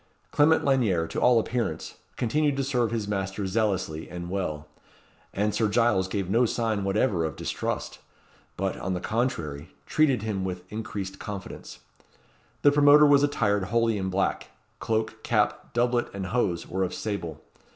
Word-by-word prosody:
Clement 155 +2 +4
Lanyere, 115 -12 +2
to - - -3
all 125 -2 +5
appearance, 115 -7 -3 0.2
continued 145 +4 +1
to 135 - 0
serve 125 -4 +1
his 110 -2 -2
master 95 0 -2
zealously 95 -6 -1
and 85 0 -6
well; 75 -6 -3 0.6
and 105 +1 0
Sir 110 - +2
Giles 110 -4 +2
gave 95 -1 -2
no 115 +5 +3
sign 110 -3 -1
whatever 95 -2 +1
of 80 -3 -3
distrust, - - -4 0.6
but, 95 0 -1
on 95 0 -2
the - - -2
contrary, 85 - -3
treated 140 -8 +2
him 105 -4 -2
with 90 -1 -4
increased 100 -3 -5
confidence. 100 -3 -8 0.8
The 145 - +7
promoter 145 +1 +7
was 145 -1 +6
attired 105 -9 +1
wholly 115 0 +1
in 95 0 -2
black 95 +1 -1 0.3
cloak, 110 0 -2
cap, 105 -3 0
doublet, 120 0 +1
and 95 -1 -3
hose 95 -6 -1
were 95 +1 -1
of 90 - -3
sable. 85 -8 -4
105 Hz, 155 wpm, -26 LUFS, 95-120 Hz, 0.8 s, The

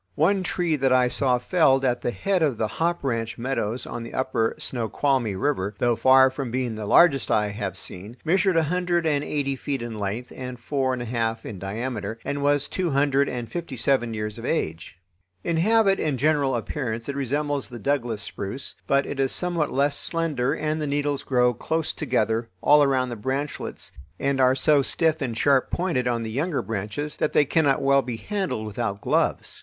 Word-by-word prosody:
One 190 +6 +3
tree 175 -3 0
that 135 -1 +1
I 125 -1 +4
saw 125 -1 +2
felled 135 0 +3
at 125 -1 +1
the - - -1
head 190 +8 0
of 145 -7 +1
the 110 - 0
Hop 170 +9 -1
Ranch 115 -4 -2
meadows 120 -2 -2
on 120 - -6
the 115 - -8
upper 130 -4 0
Snoqualmie 120 -1 -1
River, 100 -4 -1
though 120 -1 +2
far 130 +2 +6
from 130 -1 -4
being 125 -1 -2
the 110 -1 -5
largest 140 -4 +5
I 105 -1 +2
have 100 -3 -4
seen, 100 +6 -3
measured 180 +1 +3
a 165 - +4
hundred 175 +1 0
and 145 -2 +1
eighty 140 -2 -1
feet 135 +1 -3
in 115 -2 -6
length 105 +5 -4
and 125 -1 -7
four 130 +1 -1
and 125 -1 -3
a - - -6
half 115 -1 -2
in 100 -4 -7
diameter, 110 +3 -4
and 140 0 -2
was 145 0 +2
two 185 -2 -2
hundred 140 0 +2
and 120 -2 -4
fifty 170 -6 -5
seven 120 0 +1
years 105 0 -4
of - - -9
age. 80 - -2 0.5
In 170 - 0
habit 205 +2 +3
and 150 -4 0
general 145 -1 +2
appearance 115 -1 -3
it 140 - -3
resembles 140 +1 -1
the 120 - -8
Douglas 120 -3 -1
spruce, 105 +8 -5
but 140 0 +3
it 135 - -5
is 135 -1 +2
somewhat 175 -4 0
less 140 +1 +1
slender 150 -7 0
and 155 +1 -2
the 150 - -1
needles 145 0 -1
grow 125 -2 +2
close 160 +7 -2
together 115 -5 0
all 150 +8 +5
around 130 -3 +2
the 120 - -4
branchlets 135 +6 -4 0.3
and 135 -1 +1
are 130 0 +5
so 145 +2 +4
stiff 160 +3 +1
and 120 -4 -2
sharp 135 -1 +3
pointed 165 -9 -1
on 120 -1 0
the 110 - -5
younger 145 +6 -1
branches 110 +8 -4
that - - 0
they 145 - +5
cannot 145 -2 +2
well 140 0 +4
be 125 -3 -5
handled 180 - -3
without 105 -1 -3
gloves. - - 0
135 Hz, 200 wpm, -24 LUFS, 115-150 Hz, 0.5 s, far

